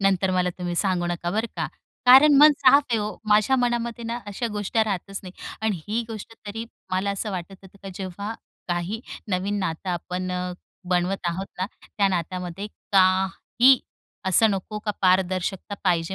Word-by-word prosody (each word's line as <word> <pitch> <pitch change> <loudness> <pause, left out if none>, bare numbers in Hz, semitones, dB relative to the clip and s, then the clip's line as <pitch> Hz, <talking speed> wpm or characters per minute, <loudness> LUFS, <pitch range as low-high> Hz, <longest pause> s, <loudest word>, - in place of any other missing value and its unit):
नंतर 195 -1 +2
मला 180 -1 +1
तुम्ही 175 -1 -3
सांगू 180 -2 +1
नका, 175 0 -2
बरं 220 +5 0
का. - - -1 0.4
कारण 275 +4 +9
मन 300 +1 +9
साफ 280 +1 +6
आहे 230 - +2
ओ. 210 0 -3
माझ्या 215 +5 +4
मनामध्ये 235 -1 -1
ना 230 +1 -3
अशा 205 +4 -3
गोष्टी 210 +2 0
राहतच 195 -1 -3
नाही. 185 -2 -9 0.3
आणि 210 -6 0
ही 225 +3 0
गोष्ट 225 0 -7
तरी 225 +3 -5 0.3
मला 190 +2 0
असं 200 +2 -2
वाटत 185 0 -5
होतं 190 +1 -16
की 195 - -7
जेव्हा 200 +4 -5 0.3
काही 175 +5 -2 0.3
नवीन 195 +2 -1
नातं 185 -1 -3
आपण 180 +1 -3
अ, 180 0 -2 0.4
बनवत 180 +1 0
आहोत 185 +3 -3
ना, 185 - 0 0.3
त्या 200 -2 +3
नातामध्ये 180 +1 -3 0.3
काही 190 +7 +4 0.5
असं 210 +4 +5
नको 200 +2 -3
का 210 - 0
पारदर्शकता 185 +1 +1
पाहिजे 175 0 +1
195 Hz, 165 wpm, -24 LUFS, 180-215 Hz, 0.5 s, कारण